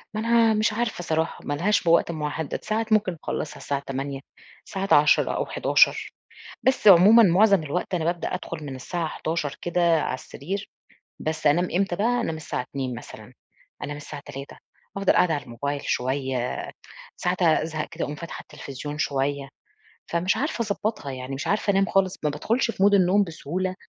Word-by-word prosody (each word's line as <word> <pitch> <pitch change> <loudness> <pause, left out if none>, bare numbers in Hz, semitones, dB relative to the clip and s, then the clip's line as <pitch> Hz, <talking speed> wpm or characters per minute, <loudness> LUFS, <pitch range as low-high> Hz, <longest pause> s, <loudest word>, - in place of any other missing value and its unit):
ما - - -1
أنا 230 -1 +4
مش 215 0 +1
عارفة 225 -5 -2
صراحة، 160 0 -1
ما 145 - -2
لهاش 195 +9 +1
بوقت 170 0 +3
محدَّد، 150 -1 -4
ساعات 220 +1 -1
ممكن 190 -5 +2
أخلَّصها 150 - -4
الساعة 140 -1 -3
20:00، 135 0 -4 0.5
ساعات 195 0 -1
22:00 150 +1 +5
أو - - -1
23:00، - - +2 0.5
بس 260 -5 +3
عمومًا 200 +6 +8
معظم 195 -1 +5
الوقت 180 +5 -3
أنا 165 -3 -1
بابدأ 170 0 -1
أدخل 170 -4 -6
من 135 -2 -6
الساعة 165 +5 -3
23:00 155 -3 -3
كده 170 -2 +2
على - - -2
السرير، 190 +10 -6 0.5
بس 155 -1 -1
أنام 175 +5 +3
إمتى 185 -1 +1
بقى، 240 +4 +1
أنام 165 -7 -2
الساعة 155 -4 -4
02:00 130 -1 -4
مثلًا، - - -11 0.5
أنام 145 0 -5
الساعة 145 -1 -8
03:00 135 +1 -9 0.4
أفضَل 195 -1 +3
قاعدة 170 -3 +3
على 145 - -2
الموبايل 140 +4 -4
شوية، 130 -1 -1 0.6
ساعات 180 +1 -1
أزهق 155 -1 +1
كده - - -3
أقوم 145 - -5
فاتحة 170 +2 -7
التلفزيون 145 0 -8
شوية. 140 -1 -1 0.6
فمش 175 +3 0
عارفة 280 -3 -1
أضبّطها 205 -10 -2
يعني، 130 +1 -6
مش 140 - -5
عارفة 205 0 +1
أنام 195 0 +3
خالص، 190 -1 +1
ما 150 - +2
بادخلش 230 - 0
في 195 - -4
Mood 205 0 +6
النوم 195 +1 +4
بسهولة. 185 +3 -3
170 Hz, 170 wpm, -25 LUFS, 145-195 Hz, 0.6 s, عمومًا